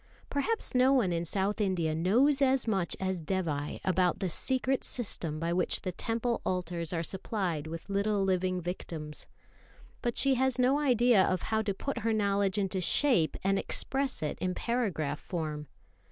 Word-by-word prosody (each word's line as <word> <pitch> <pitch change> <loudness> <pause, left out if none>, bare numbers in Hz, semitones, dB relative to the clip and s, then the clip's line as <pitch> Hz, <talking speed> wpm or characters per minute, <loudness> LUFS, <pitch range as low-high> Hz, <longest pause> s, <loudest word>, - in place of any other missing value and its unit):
Perhaps 285 +11 0
no 255 +1 +4
one 230 -9 +2
in 170 0 -1
South 200 +4 -1
India 175 -6 0
knows 245 - +3
as 265 -2 +3
much 190 -5 0
as 190 -2 -2
Dévai 155 -5 -2
knows - - -8
about 185 -1 +2
the 190 -3 -2
secret 260 - 0
system 165 -10 -2
by 170 +1 -1
which 180 0 +1
the 185 - -3
Temple 230 +5 -2
altars 175 -2 -2
are 165 -2 -1
supplied 180 -4 -2
with 165 +1 -7
little 200 0 0
living 185 -1 0
victims; 165 -3 -5 0.7
but 240 -2 -2
she 275 -1 +3
has 260 0 +2
no 260 +3 +3
idea 245 -7 +4
of 185 -1 0
how 220 0 0
to 205 -3 -2
put 275 +7 -3
her 225 +1 0
knowledge 200 -2 +1
into 195 -2 -1
shape 215 - +3
and 195 0 +2
express 270 - 0
it 150 - -3
in 180 0 -1
paragraph 190 - -1
form. 155 -4 -4
195 Hz, 170 wpm, -30 LUFS, 170-240 Hz, 0.7 s, no